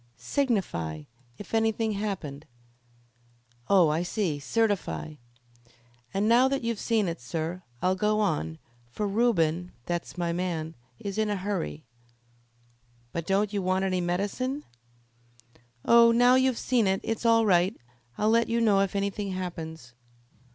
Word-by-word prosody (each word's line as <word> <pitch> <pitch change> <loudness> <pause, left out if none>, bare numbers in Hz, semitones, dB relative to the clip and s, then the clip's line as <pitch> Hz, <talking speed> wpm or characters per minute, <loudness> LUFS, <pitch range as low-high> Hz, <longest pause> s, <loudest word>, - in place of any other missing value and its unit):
"Signify, 125 - -1 0.3
if 205 - -11
anything 225 0 +1
happened." 185 -8 -4 1.2
"Oh, 185 -5 +5
I 155 +2 +1
see 175 -4 -1
certify." 205 -2 -1 1.0
"And 200 +2 0
now 240 +3 +5
that 275 -1 -1
you've 230 -2 -2
seen 220 -4 +1
it, 165 -3 -4
sir, 165 +8 -4 0.2
I'll 185 - +3
go 210 +2 +1
on, 80 - -1 0.3
for 210 - -3
Reuben 180 -6 +1
that's 175 +1 -4
my 170 -1 -1
man 170 -3 -3 0.2
is 200 - -5
in 215 -1 +1
a 205 - 0
hurry." 185 - -3 1.3
"But 170 -1 -4
don't 200 +2 +1
you 200 - 0
want 185 +1 +1
any 185 -1 0
medicine?" 205 +11 -2 1.2
"Oh, 235 0 +7
now 245 +2 +5
you've 260 -1 +3
seen 240 -5 +1
it, 190 0 +1
it's 225 0 -3
all 230 -1 +4
right. 185 +1 +3 0.4
I'll 215 +1 +2
let 230 0 +3
you 230 0 +1
know 210 -4 +4
if 195 0 0
anything 200 0 -2
happens." 160 -8 -6
195 Hz, 140 wpm, -27 LUFS, 170-225 Hz, 1.3 s, Oh